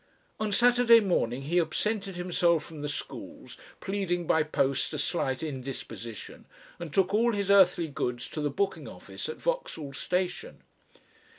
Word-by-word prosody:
On 215 -1 -1
Saturday 240 +1 +6
morning 135 - 0
he 170 +6 +2
absented 195 +4 -2
himself 175 -2 +2
from 160 -3 -9
the 145 - -3
schools, 145 - -7 0.3
pleading 190 -3 -1
by 160 - +3
post 140 -3 0
a - - -2
slight 140 -2 -1
indisposition, 130 -6 -7 0.3
and 170 -3 -6
took 190 +3 +2
all 230 +2 +3
his 200 -1 0
earthly 180 -4 +5
goods 125 -4 -3
to 155 - -4
the 145 - 0
booking 190 +7 -2
office - - -7
at 465 - -5
Vauxhall 325 - -3
Station. 180 - -3
175 Hz, 150 wpm, -28 LUFS, 145-200 Hz, 0.3 s, Saturday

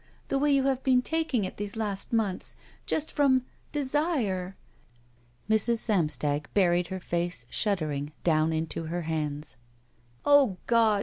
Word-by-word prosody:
The 275 - +1
way 290 +1 +3
you 275 -1 +4
have 265 -1 +1
been 255 -2 +3
taking 320 -10 0
it 185 - -7
these 205 +1 -4
last 205 -3 -2
months. 215 -5 -1 0.3
Just 315 0 -1
frx)m 265 -4 +4
— - - -36
desire." 260 - 0 0.9
Mrs. 220 +2 +2
Samstag 150 - 0
buried 175 -3 +3
her 190 0 -4
face, 170 -7 -2
shuddering, 155 -8 -1
down 160 -1 +3
into 160 +1 -2
her 170 +2 -3
hands. 150 -3 -3 0.7
O 280 -9 +5
God! 225 -3 +4
200 Hz, 140 wpm, -28 LUFS, 165-255 Hz, 0.9 s, O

